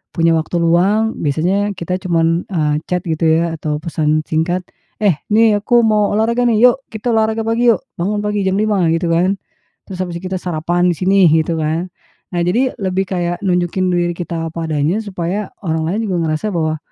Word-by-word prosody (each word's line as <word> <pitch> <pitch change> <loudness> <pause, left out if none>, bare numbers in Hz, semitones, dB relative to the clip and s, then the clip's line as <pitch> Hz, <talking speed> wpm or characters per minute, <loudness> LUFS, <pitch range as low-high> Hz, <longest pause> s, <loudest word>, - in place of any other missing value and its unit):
punya 165 -1 +3
waktu 160 +2 -3
luang, 195 +7 +2
biasanya 185 +8 0
kita 180 +1 -3
cuman, 170 -2 0
eee, 155 -6 0
chat 180 -1 -1
gitu 165 -1 0
ya 165 +1 +2
atau 150 -1 -3
pesan 155 -2 0
singkat, 170 +3 0 0.4
"Eh, 200 -6 +3 0.2
nih, 220 -1 +5
aku 240 +2 +4
mau 215 -2 +2
olahraga, 230 +3 +1
nih, 235 +1 +5
yuk 265 +2 -4
kita 220 +2 -4
olahraga 220 0 +1
pagi 235 +1 +3
yuk. 215 - 0 0.2
Bangun 205 +5 -1
pagi 210 -1 -1
jam 190 +1 +1
5," 210 -4 +1
gitu 165 +1 -1
kan, 175 +4 +2 0.5
"terus 190 - -6
habis 175 -2 -5
itu 185 +1 -6
kita 185 - -2
sarapan 175 +1 0
di - - -2
sini." 190 0 +4
Gitu 160 +1 +1
kan. 160 +3 -1 0.5
Nah, 175 - +1
jadi 245 +9 0
lebih 190 -2 -2
kayak 175 -2 -2
nunjukin 180 -1 0
diri 175 -1 0
kita 165 -1 -4
apa 165 -1 -4
adanya 155 +7 0
supaya 195 0 -3 0.2
orang 160 -1 0
lain 200 +6 -1
juga 185 -3 -1
ngerasa 155 +7 -2
bahwa, 155 -2 0
180 Hz, 190 wpm, -17 LUFS, 165-205 Hz, 0.5 s, nih